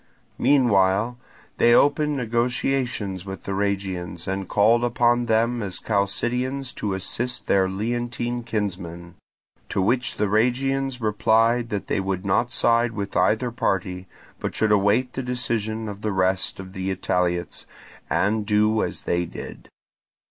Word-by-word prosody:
Meanwhile 120 Hz, -3 st, +3 dB, 0.4 s
they 120 Hz, 0 st, +6 dB
opened 150 Hz, 0 st, +3 dB
negotiations 120 Hz, -4 st, -1 dB
with 95 Hz, -1 st, -8 dB
the -, -, -5 dB
Rhegians, 95 Hz, -4 st, -2 dB
and 95 Hz, 0 st, -2 dB
called 115 Hz, +3 st, +4 dB
upon 120 Hz, 0 st, +2 dB
them 115 Hz, +2 st, +2 dB
as 95 Hz, -3 st, -3 dB
Chalcidians 125 Hz, +6 st, -1 dB
to 100 Hz, -2 st, -2 dB
assist 120 Hz, +6 st, -3 dB
their 95 Hz, -1 st, +3 dB
Leontine 120 Hz, +4 st, -2 dB
kinsmen; 90 Hz, -6 st, -4 dB, 0.6 s
to -, -, -1 dB
which 120 Hz, +6 st, +1 dB
the 105 Hz, -, +1 dB
Rhegians 125 Hz, +4 st, +1 dB
replied 115 Hz, +2 st, +2 dB
that 105 Hz, -3 st, -3 dB
they -, -, -1 dB
would 95 Hz, 0 st, -2 dB
not 100 Hz, +6 st, +1 dB
side 115 Hz, -1 st, +2 dB
with 100 Hz, -2 st, -5 dB
either 110 Hz, +7 st, +2 dB
party, 95 Hz, -5 st, -2 dB, 0.3 s
but -, -, -4 dB
should 110 Hz, -1 st, +2 dB
await 105 Hz, +5 st, +3 dB
the 130 Hz, -, -3 dB
decision 115 Hz, -3 st, -2 dB
of 100 Hz, 0 st, -7 dB
the 110 Hz, -, -1 dB
rest 95 Hz, 0 st, 0 dB
of 95 Hz, 0 st, -9 dB
the 95 Hz, -1 st, -3 dB
Italiots, 90 Hz, -2 st, -1 dB, 0.4 s
and 105 Hz, +2 st, +1 dB
do 105 Hz, +1 st, +2 dB
as -, -, -3 dB
they 85 Hz, 0 st, -1 dB
did. -, -, -9 dB
110 Hz, 140 wpm, -24 LUFS, 95-120 Hz, 0.6 s, they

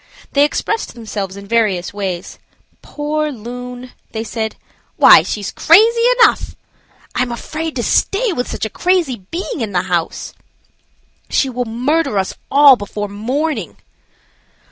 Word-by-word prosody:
They 285 Hz, -, +4 dB
expressed 435 Hz, -, -2 dB
themselves 205 Hz, -4 st, -5 dB
in 200 Hz, -, -9 dB
various 200 Hz, -5 st, 0 dB
ways. 190 Hz, -3 st, -5 dB, 0.4 s
"Poor 300 Hz, +1 st, -2 dB
loon!" 245 Hz, +1 st, -8 dB, 0.2 s
they 220 Hz, -1 st, -3 dB
said. 220 Hz, 0 st, -4 dB, 0.4 s
"Why, -, -, +8 dB
she's 205 Hz, -2 st, -4 dB
crazy 450 Hz, +8 st, +5 dB, 0.2 s
enough!" 455 Hz, -, +3 dB, 0.6 s
"I -, -, 0 dB
am 250 Hz, -1 st, -1 dB
afraid 310 Hz, +6 st, -5 dB
to 240 Hz, -, -2 dB
stay 410 Hz, -, +1 dB
with 245 Hz, -5 st, -3 dB
such -, -, -3 dB
a -, -, -3 dB
crazy 345 Hz, -7 st, +1 dB
being 335 Hz, -4 st, -4 dB
in 205 Hz, -4 st, -3 dB
house." 175 Hz, -2 st, -2 dB, 1.0 s
"She 270 Hz, -, +1 dB
will 250 Hz, 0 st, -2 dB
murder 250 Hz, +2 st, 0 dB
us 190 Hz, -1 st, -1 dB, 0.2 s
all 280 Hz, -1 st, +7 dB
before 205 Hz, 0 st, -5 dB
morning." 240 Hz, -, -3 dB
245 Hz, 135 wpm, -17 LUFS, 210-300 Hz, 1.0 s, Why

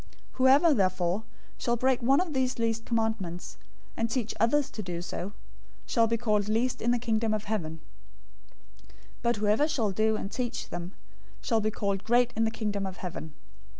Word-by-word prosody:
005:019 -, -, -25 dB, 0.3 s
Whoever, 275 Hz, +5 st, +5 dB
therefore, 185 Hz, -2 st, +1 dB, 0.4 s
shall 240 Hz, -, +1 dB
break 255 Hz, +1 st, +2 dB
one 270 Hz, +4 st, +4 dB
of 355 Hz, -4 st, -1 dB
these 260 Hz, -1 st, 0 dB
least 225 Hz, -1 st, -1 dB
commandments, 220 Hz, -7 st, -2 dB, 0.4 s
and 230 Hz, 0 st, 0 dB
teach 230 Hz, -2 st, -1 dB
others 280 Hz, +5 st, +2 dB
to 215 Hz, -, -5 dB
do 175 Hz, -3 st, -4 dB
so, 175 Hz, +2 st, -5 dB, 0.5 s
shall 230 Hz, -2 st, +3 dB
be 230 Hz, +1 st, +1 dB
called 210 Hz, -3 st, +1 dB
least 250 Hz, +3 st, 0 dB
in 235 Hz, -, +1 dB
the 245 Hz, -, +3 dB
Kingdom 225 Hz, -2 st, 0 dB
of 210 Hz, -, -3 dB
Heaven; 160 Hz, -7 st, -3 dB, 1.4 s
but 235 Hz, 0 st, +2 dB
whoever 210 Hz, +8 st, +2 dB
shall 230 Hz, -9 st, 0 dB
do 220 Hz, +3 st, +2 dB
and 200 Hz, -1 st, -4 dB
teach 245 Hz, -1 st, -3 dB
them 175 Hz, +2 st, -5 dB, 0.5 s
shall 225 Hz, -3 st, +1 dB
be 215 Hz, -, +1 dB
called 200 Hz, -2 st, -2 dB
great 245 Hz, +1 st, +3 dB
in 225 Hz, +1 st, +2 dB
the -, -, +2 dB
Kingdom 205 Hz, -3 st, -2 dB
of 190 Hz, -, -7 dB
Heaven. 160 Hz, -4 st, -6 dB
225 Hz, 180 wpm, -29 LUFS, 200-240 Hz, 1.4 s, Whoever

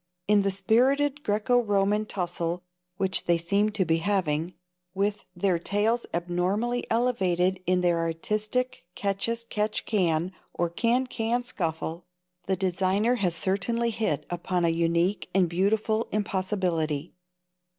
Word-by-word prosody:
In 205 Hz, 0 st, +5 dB
the 195 Hz, -, +1 dB
spirited 265 Hz, +9 st, +2 dB
Graeco 220 Hz, +4 st, +2 dB
Roman 205 Hz, 0 st, +1 dB
tussle 175 Hz, -2 st, -2 dB, 0.3 s
which 190 Hz, -1 st, 0 dB
they 170 Hz, -1 st, +3 dB
seem 200 Hz, +5 st, +1 dB
to 205 Hz, -3 st, 0 dB
be 165 Hz, 0 st, +2 dB
having, 170 Hz, -2 st, 0 dB, 0.4 s
with 205 Hz, +1 st, -1 dB
their 175 Hz, -1 st, +1 dB
tails 210 Hz, +6 st, 0 dB
abnormally 185 Hz, +8 st, -1 dB
elevated 190 Hz, -6 st, +1 dB
in 180 Hz, 0 st, +3 dB
their 175 Hz, -1 st, +2 dB
artistic 215 Hz, +9 st, -2 dB
catch 200 Hz, +2 st, -1 dB
as 230 Hz, 0 st, -2 dB
catch 215 Hz, -2 st, -2 dB
can 175 Hz, -4 st, +1 dB, 0.2 s
or 170 Hz, -1 st, 0 dB
can 240 Hz, +7 st, +2 dB
can 240 Hz, 0 st, -1 dB
scuffle, 170 Hz, -7 st, -4 dB, 0.4 s
the 190 Hz, -, +2 dB
designer 190 Hz, +5 st, +1 dB
has 180 Hz, -6 st, 0 dB
certainly 230 Hz, +7 st, 0 dB
hit 215 Hz, -10 st, -1 dB
upon 175 Hz, 0 st, -1 dB
a -, -, +3 dB
unique 170 Hz, +3 st, +1 dB
and 185 Hz, -2 st, +4 dB
beautiful 215 Hz, +5 st, +1 dB
impossibility. 185 Hz, -7 st, -1 dB
195 Hz, 130 wpm, -27 LUFS, 175-220 Hz, 0.4 s, In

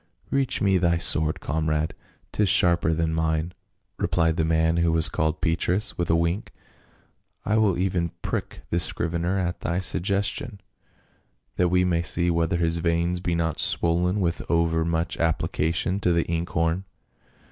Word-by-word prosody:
" -, -, -46 dB
Reach 135 Hz, -2 st, 0 dB
me 95 Hz, -2 st, +3 dB
thy 85 Hz, -1 st, +2 dB
sword, 80 Hz, -1 st, +2 dB
comrade, 80 Hz, 0 st, -1 dB, 0.4 s
'tis 105 Hz, -2 st, +1 dB
sharper 85 Hz, -2 st, +4 dB
than 80 Hz, 0 st, -1 dB
mine," 80 Hz, +1 st, -1 dB, 0.5 s
replied 80 Hz, -1 st, +1 dB
the 80 Hz, -, 0 dB
man 80 Hz, +1 st, +1 dB
who 85 Hz, -1 st, +2 dB
was 80 Hz, 0 st, +4 dB
called 80 Hz, -3 st, -2 dB
Petrus, 90 Hz, +3 st, 0 dB
with 85 Hz, -1 st, -3 dB
a 80 Hz, -, +4 dB
wink. 85 Hz, +5 st, -1 dB, 0.5 s
" -, -, -40 dB
I 110 Hz, +1 st, +2 dB
will 105 Hz, -5 st, +2 dB
even 90 Hz, -2 st, -1 dB
prick -, -, -4 dB
this 85 Hz, 0 st, +1 dB
scrivener 85 Hz, +3 st, -1 dB
at 90 Hz, -2 st, -2 dB
thy 85 Hz, -, -2 dB
sug 95 Hz, -1 st, +1 dB
gestion, 100 Hz, +5 st, -1 dB, 1.0 s
that 90 Hz, -1 st, +2 dB
we 90 Hz, +1 st, +2 dB
may 85 Hz, -2 st, +1 dB
see 85 Hz, 0 st, +2 dB
whether 85 Hz, 0 st, 0 dB
his 85 Hz, 0 st, 0 dB
veins 85 Hz, +1 st, 0 dB
be 85 Hz, -1 st, -2 dB
not 80 Hz, -2 st, -1 dB
swollen 90 Hz, +4 st, +2 dB
with 85 Hz, -3 st, -1 dB
over 85 Hz, -1 st, +1 dB
much 85 Hz, +1 st, -1 dB
application 80 Hz, +3 st, 0 dB
to 90 Hz, -3 st, +1 dB
the 85 Hz, -1 st, +2 dB
inkhorn." 85 Hz, +2 st, -1 dB
85 Hz, 165 wpm, -24 LUFS, 80-90 Hz, 1.0 s, sharper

